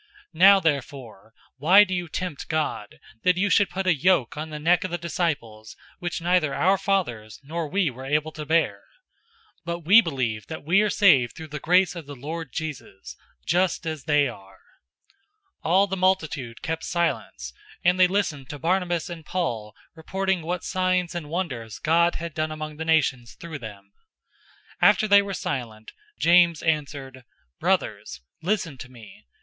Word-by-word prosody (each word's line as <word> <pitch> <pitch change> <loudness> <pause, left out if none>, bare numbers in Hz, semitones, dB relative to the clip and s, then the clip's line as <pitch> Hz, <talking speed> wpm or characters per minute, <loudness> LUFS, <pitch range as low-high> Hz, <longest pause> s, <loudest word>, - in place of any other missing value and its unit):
015:010 160 - -14
Now 195 +2 +8
therefore 135 - -3 0.2
why 180 +9 +7
do 185 -2 -3
you 180 -1 -2
tempt 180 -4 -5
God, 155 -9 -3 0.2
that 180 -1 +2
you 200 +2 +1
should 200 -3 +4
put 190 0 -4
a 185 - +4
yoke 150 -5 +2
on 155 +1 -5
the 155 - -6
neck 170 +4 +2
of 185 - -3
the 175 - -3
disciples 150 -11 -3 0.2
which 175 0 -3
neither 175 -5 +2
our 190 +5 +2
fathers 120 - -2
nor 160 +3 -4
we 185 -2 0
were 130 +2 -9
able 150 +2 0
to 155 - -7
bear? 160 +2 +1 0.8
015:011 - - -50
But 170 0 -3
we 195 +8 +7
believe 125 - -3
that 160 -2 -7
we 175 +7 +3
are 215 - +1
saved 150 - +4
through 160 -1 -9
the 150 0 -6
grace 180 +3 +3
of 165 -4 -8
the 145 - -8
Lord 155 +2 -6
Jesus,{TR 150 -10 -6
adds - - -10
"Christ"} - - -33
just 175 0 +1
as 155 -4 -5
they 150 -2 +3
are." 95 -5 -11 1.1
015:012 - - -3
All 190 +3 +5
the 195 -1 -4
multitude 165 -10 -1
kept 160 +1 -3
silence, 170 -1 -2 0.3
and 180 +1 +3
they 185 - +7
listened 175 -9 -2
to 145 - -6
Barnabas 175 +2 0
and 170 -2 -8
Paul 120 -12 -3 0.2
reporting 190 +3 -2
what 175 +2 -4
signs 185 -1 0
and 170 -4 -6
wonders 135 - -4
God 170 +2 +2
had 170 -1 -6
done 155 +1 -2
among 155 -1 -6
the 160 - -4
nations 135 -7 +1
through 170 -5 -8
them. 100 -4 -11 0.9
015:013 - - +8
After 215 - +2
they 200 0 +7
were 200 -1 -5
silent, 110 -8 -5 0.3
James 170 -2 +4
answered, 140 -5 -2 0.4
"Brothers, 70 -1 -1 0.2
listen 170 -6 -2
to 130 - -9
me. 115 - -15
160 Hz, 180 wpm, -24 LUFS, 140-180 Hz, 1.1 s, Now